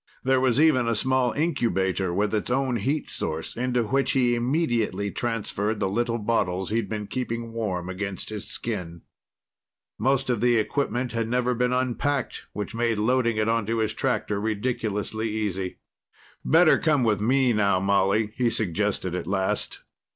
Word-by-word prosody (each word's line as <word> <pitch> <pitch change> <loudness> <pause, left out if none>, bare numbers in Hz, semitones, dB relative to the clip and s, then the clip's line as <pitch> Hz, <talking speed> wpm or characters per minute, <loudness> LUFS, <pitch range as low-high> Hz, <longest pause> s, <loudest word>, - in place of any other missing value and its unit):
There 130 0 +3
was 130 0 +2
even 145 -6 +4
a 115 - +1
small 130 +2 +2
incubator 95 - 0
with 100 +4 0
its 105 +1 -1
own 130 -1 +1
heat 140 +8 -1
source 80 +1 -3
into 125 0 0
which 135 +5 +1
he 125 -2 +3
immediately 120 - 0
transferred 110 -2 -2
the 95 - +1
little 115 +4 0
bottles 100 -4 -1
he'd 115 -2 0
been 105 -1 -3
keeping 115 0 -4
warm 95 -6 -2
against 95 +1 -4
his 105 -1 -5
skin. 90 -7 -4 1.0
Most 130 +2 +1
of 115 -4 -1
the 120 0 +4
equipment 120 +2 -1
had 115 -1 -1
never 125 +1 +1
been 125 +1 0
unpacked, 130 +2 -1
which 105 +2 -5
made 115 -1 0
loading 115 +1 +1
it 110 0 +1
onto 115 0 0
his 110 -1 0
tractor 110 -5 -1
ridiculously 110 0 -2
easy. 100 -4 -3 0.7
"Better 165 0 +5
come 150 -5 +2
with 105 -4 +1
me 130 +2 +3
now, 100 -3 +2
Molly," 100 +2 +2
he 125 -2 +2
suggested 100 -3 -1
at 90 - -3
last. 95 0 -1
115 Hz, 160 wpm, -25 LUFS, 100-125 Hz, 1.0 s, Better